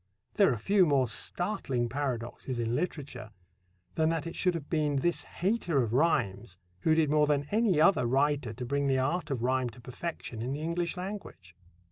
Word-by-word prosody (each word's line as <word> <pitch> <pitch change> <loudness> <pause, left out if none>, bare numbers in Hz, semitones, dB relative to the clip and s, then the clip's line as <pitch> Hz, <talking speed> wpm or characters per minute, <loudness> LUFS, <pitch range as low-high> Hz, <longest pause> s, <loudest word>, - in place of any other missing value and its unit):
There 200 -6 +4
are 120 - -1
few 190 - +3
more 135 -4 +3
startling 125 - -1
paradoxes 125 -1 -3
in 115 0 -1
literature 135 -7 -4 0.6
than 160 0 +2
that 165 -1 -1
it 170 - -6
should 180 -2 +1
have 150 -4 -5
been 150 -3 0
this 170 +6 0
hater 175 - 0
of 115 -1 -3
rhymes 115 - +1 0.2
who 155 - +3
did 155 -2 +2
more 150 -1 +4
than 145 -1 +1
any 210 -6 +3
other 160 -7 +4
writer 135 -1 +1
to 125 +3 -6
bring 140 +2 0
the 135 -1 +2
art 150 +5 -1
of 130 -4 -2
rhyme 130 0 +1
to 115 - -14
perfection 125 -2 -6
in 125 +3 -2
the 145 - -4
English 170 +2 -2
language. 180 - -7
145 Hz, 185 wpm, -30 LUFS, 125-165 Hz, 0.6 s, There